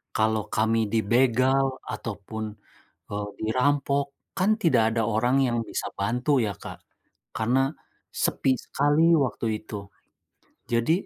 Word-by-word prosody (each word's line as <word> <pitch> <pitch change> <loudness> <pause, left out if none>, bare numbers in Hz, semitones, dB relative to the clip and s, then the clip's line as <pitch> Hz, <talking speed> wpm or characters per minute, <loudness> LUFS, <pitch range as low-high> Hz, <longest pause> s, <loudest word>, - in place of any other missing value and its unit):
kalau 110 -1 +1
kami 110 0 +2
dibegal 130 +5 +3 0.2
ataupun, 110 0 -6 0.6
eee, 105 0 -4
dirampok 140 +4 +1 0.3
kan 190 +3 +2
tidak 165 -9 +4 0.2
ada - - +3
orang 120 +4 +2
yang 120 -1 0
bisa - - -4
bantu," 125 +7 +1
ya, - - -1
Kak, - - -9 0.5
karena 130 +4 +2 0.4
sepi 135 - 0
sekali 145 +2 +2
waktu 130 -7 0 0.2
itu. 105 -1 -6 0.9
Jadi 115 +6 +2
120 Hz, 115 wpm, -26 LUFS, 110-135 Hz, 0.9 s, tidak